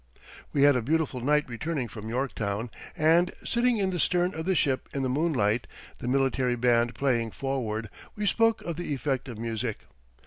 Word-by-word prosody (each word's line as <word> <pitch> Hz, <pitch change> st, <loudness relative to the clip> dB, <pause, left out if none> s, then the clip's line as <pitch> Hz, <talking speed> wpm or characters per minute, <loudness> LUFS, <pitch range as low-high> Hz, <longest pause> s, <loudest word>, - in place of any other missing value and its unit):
We 140 Hz, -, +2 dB
had 145 Hz, -1 st, +7 dB
a 125 Hz, -, +1 dB
beautiful 150 Hz, +1 st, 0 dB
night 150 Hz, +3 st, +2 dB
returning 130 Hz, +2 st, -3 dB
from 110 Hz, -1 st, -8 dB
Yorktown, 115 Hz, -3 st, -2 dB, 0.3 s
and, 165 Hz, +3 st, +4 dB
sitting 240 Hz, 0 st, +2 dB
in 195 Hz, -2 st, +1 dB
the 180 Hz, -, -2 dB
stern 180 Hz, +2 st, +2 dB
of 160 Hz, +2 st, -5 dB
the 190 Hz, -, +2 dB
ship 135 Hz, -5 st, +1 dB
in 135 Hz, -, 0 dB
the 130 Hz, -, 0 dB
moonlight, 125 Hz, -6 st, +1 dB, 0.3 s
the -, -, -5 dB
military 130 Hz, -1 st, +1 dB
band 120 Hz, 0 st, +2 dB
playing 120 Hz, -5 st, +1 dB
forward, 115 Hz, -4 st, -3 dB, 0.3 s
we 210 Hz, -, -2 dB
spoke 225 Hz, +2 st, +3 dB
of 170 Hz, -2 st, -4 dB
the 170 Hz, -4 st, -2 dB
effect 135 Hz, 0 st, -2 dB
of 120 Hz, -, -7 dB
music. 115 Hz, 0 st, -3 dB
135 Hz, 180 wpm, -28 LUFS, 120-160 Hz, 0.3 s, had